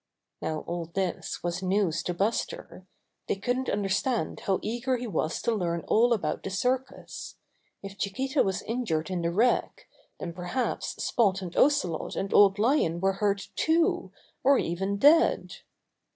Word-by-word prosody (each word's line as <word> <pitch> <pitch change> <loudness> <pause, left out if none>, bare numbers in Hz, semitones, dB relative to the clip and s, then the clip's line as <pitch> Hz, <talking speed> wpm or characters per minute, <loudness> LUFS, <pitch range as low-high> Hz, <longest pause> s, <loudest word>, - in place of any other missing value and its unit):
Now 155 -1 -2
all 170 -1 -4
this 180 +2 -3
was 175 +1 -2
news 185 -3 +1
to 180 - -3
Buster. 195 -2 -3 0.4
They - - +1
couldn't 245 +6 -1
understand 200 +5 -1
how 190 -1 0
eager 240 +3 -1
he 245 - -5
was 165 -7 -1
to 235 - +1
learn 170 -5 -1
all 235 +3 +4
about 185 -10 0
the - - -5
circus. 250 +7 -3 0.5
If 195 0 -9
Chiquita 265 +8 0
was 190 -1 -1
injured 205 -9 -2
in 180 -2 -1
the 170 - 0
wreck, 245 - +1 0.3
then 170 - -5
perhaps 180 +9 -2
Spot 200 -5 +2
and 175 -2 -7
Ocelot 185 - +2
and 195 - -3
Old 200 -1 +6
Lion 210 - +2
were 195 +1 +2
hurt, 200 0 -1
too, 325 +1 +1 0.3
or 275 +1 +5
even 190 +4 -1
dead. 305 +9 +4
195 Hz, 150 wpm, -28 LUFS, 180-245 Hz, 0.5 s, Old